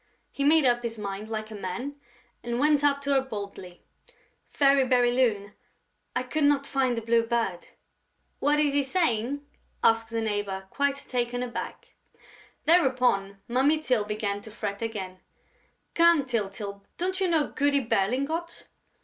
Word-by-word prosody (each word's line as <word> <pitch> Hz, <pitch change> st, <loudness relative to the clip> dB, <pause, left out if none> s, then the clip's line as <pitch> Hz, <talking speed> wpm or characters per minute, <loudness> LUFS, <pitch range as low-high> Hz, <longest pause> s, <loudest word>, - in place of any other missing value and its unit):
He 280 Hz, -, -3 dB
made 305 Hz, 0 st, +5 dB
up 240 Hz, -1 st, +3 dB
his 230 Hz, -1 st, -4 dB
mind 200 Hz, +1 st, -5 dB
like 215 Hz, 0 st, -4 dB
a -, -, -6 dB
man 205 Hz, +9 st, -4 dB, 0.5 s
and 240 Hz, 0 st, -3 dB
went 295 Hz, 0 st, +3 dB
up 280 Hz, -1 st, +2 dB
to 280 Hz, -, -1 dB
her 270 Hz, -, +4 dB
boldly: 200 Hz, -7 st, -8 dB, 0.7 s
"Fairy 275 Hz, -1 st, +4 dB
Bérylune, 245 Hz, -5 st, +2 dB, 0.6 s
I -, -, 0 dB
could 290 Hz, +4 st, 0 dB
not 285 Hz, -1 st, +3 dB
find 265 Hz, -3 st, 0 dB
the 230 Hz, -, -3 dB
Blue 230 Hz, +1 st, +3 dB
Bird...." 230 Hz, -6 st, -2 dB, 0.7 s
"What 295 Hz, +1 st, +2 dB
is 295 Hz, -2 st, +2 dB
he 285 Hz, -, +3 dB
saying?" 275 Hz, -3 st, 0 dB, 0.4 s
asked 225 Hz, 0 st, +3 dB
the 230 Hz, 0 st, -2 dB
neighbor, 205 Hz, -3 st, -2 dB
quite 280 Hz, 0 st, +1 dB
taken 245 Hz, -2 st, -2 dB
aback. 245 Hz, 0 st, -6 dB, 0.7 s
Thereupon 250 Hz, -, +2 dB
Mummy 265 Hz, +6 st, +3 dB
Tyl 255 Hz, -8 st, +1 dB
began 205 Hz, -1 st, -3 dB
to 220 Hz, -, -11 dB
fret 205 Hz, -1 st, -5 dB
again: 195 Hz, -5 st, -5 dB, 0.7 s
"Come, 335 Hz, -4 st, +5 dB
Tyltyl, 200 Hz, -4 st, -4 dB
don't 375 Hz, +2 st, -2 dB
you 380 Hz, -, +3 dB
know 320 Hz, -4 st, +1 dB
Goody 285 Hz, -1 st, +2 dB
Berlingot?" 275 Hz, -, -1 dB
245 Hz, 150 wpm, -27 LUFS, 210-280 Hz, 0.7 s, made